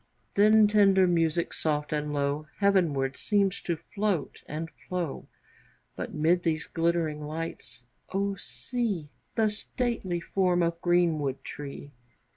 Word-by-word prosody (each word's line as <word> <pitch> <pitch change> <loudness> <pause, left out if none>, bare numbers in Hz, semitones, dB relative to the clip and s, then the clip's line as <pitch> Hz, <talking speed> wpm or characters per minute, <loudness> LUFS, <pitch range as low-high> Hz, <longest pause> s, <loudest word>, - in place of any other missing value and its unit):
Then 215 +1 +6
tender 200 -2 +5
music, 170 -1 +1
soft 150 -1 -1
and 150 0 -1
low, 145 +1 -1
Heavenward 165 -10 +2
seems 200 -2 +1
to 170 -2 -2 0.2
float 200 -8 -1
and 160 +2 -5 0.2
flow, 175 -5 -3 0.7
But - - -5
mid 165 +4 +2
these 160 -2 0
glittering 165 -2 0
lights, 155 -4 -6 0.3
O 200 +1 0
see 195 - -3 0.2
The 220 -2 +3
stately 210 -5 -2
form 180 0 +1
of 170 0 -1
greenwood 160 -6 +1
tree! 145 0 -7
170 Hz, 120 wpm, -28 LUFS, 150-195 Hz, 0.7 s, Then